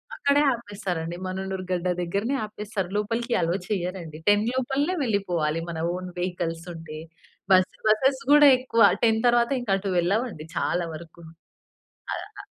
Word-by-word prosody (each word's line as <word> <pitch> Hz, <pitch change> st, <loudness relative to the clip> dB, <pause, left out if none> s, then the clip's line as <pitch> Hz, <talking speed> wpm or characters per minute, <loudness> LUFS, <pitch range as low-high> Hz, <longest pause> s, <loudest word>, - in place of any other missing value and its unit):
అక్కడే 280 Hz, +1 st, +3 dB
ఆపేస్తారండి. 195 Hz, -7 st, -4 dB
మననూరు 190 Hz, 0 st, -4 dB
గడ్డ 180 Hz, 0 st, -1 dB
దెగ్గరనే 200 Hz, +10 st, -1 dB
ఆపేస్తారు. 210 Hz, -3 st, -5 dB
లోపలికి 230 Hz, +3 st, -1 dB
అలోవ్ 170 Hz, +3 st, 0 dB
చెయ్యరండి. 180 Hz, -5 st, -3 dB
10 205 Hz, +1 st, +4 dB
లోపలనే 270 Hz, +7 st, 0 dB
వెళ్ళిపోవాలి. 175 Hz, -8 st, 0 dB
మన 160 Hz, -1 st, -4 dB
ఓన్ 185 Hz, 0 st, -5 dB
వెహికల్సుంటే. 165 Hz, -3 st, -4 dB, 0.5 s
బస్ 185 Hz, 0 st, +4 dB
బసెస్ 265 Hz, +5 st, +3 dB
గూడా 295 Hz, 0 st, +8 dB
ఎక్కువ 230 Hz, -3 st, 0 dB, 0.2 s
10 225 Hz, -1 st, +3 dB
తర్వాత 240 Hz, +2 st, +3 dB
ఇంకా 210 Hz, -5 st, 0 dB
అటు 195 Hz, 0 st, -4 dB
వెళ్ళవండి 195 Hz, -2 st, -1 dB
చాలా 175 Hz, 0 st, 0 dB
వరకు. 170 Hz, +1 st, -12 dB, 0.9 s
ఆహ్ 405 Hz, 0 st, -8 dB
195 Hz, 130 wpm, -25 LUFS, 175-235 Hz, 0.9 s, గూడా